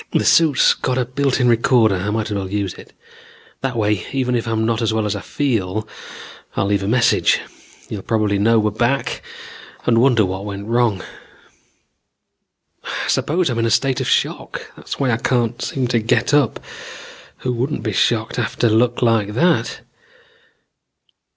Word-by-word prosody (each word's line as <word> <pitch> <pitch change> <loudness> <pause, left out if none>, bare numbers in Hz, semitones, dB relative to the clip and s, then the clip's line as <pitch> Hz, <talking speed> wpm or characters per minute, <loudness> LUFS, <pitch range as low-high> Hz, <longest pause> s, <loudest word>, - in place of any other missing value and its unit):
This - - +2
suit's 155 -6 +4
got 130 -1 -2
a 125 - +1
built 135 +2 0
in 125 - +3
recorder, 115 -2 +3
I 95 +2 -2
might 110 0 -2
as - - -1
well 95 -2 -3
use 100 -2 -2
it. - - -14 0.7
That 135 -2 -2
way 105 -3 0
even 130 -2 -1
if 120 -1 -1
I'm 110 -1 0
not 115 +1 0
as 115 -1 +1
well 110 -1 0
as 105 - -1
I - - -5
feel, 110 -7 -2 0.7
I'll - - 0
leave 100 0 +1
a 95 - -3
message. 115 +2 +3 0.5
You 105 - -6
probably 105 -2 0
know 115 +3 +4
we're 105 -1 +1
back 120 +6 -1 0.6
and 115 -1 +3
wonder 120 -5 +4
what 95 +1 -4
went 100 -1 -6
wrong. 115 -3 +1 1.8
"I - - -4
suppose 165 -1 +1
I'm 115 - -2
in 115 - +1
a - - +1
state 130 +3 +1
of - - -2
shock. - - -1
That's - - -7
why 135 -3 +1
I 115 - +1
can't 120 -1 0
seem 130 -2 -2
to 120 -2 +2
get 115 +6 +1
up. 145 -6 +2 0.8
Who 125 - -3
wouldn't 130 +5 -2
be 110 -4 -2
shocked 110 +3 +1
after 120 0 0
luck 120 +3 +2
like 110 -3 +1
that? 170 +7 +1
115 Hz, 175 wpm, -19 LUFS, 105-125 Hz, 1.8 s, suit's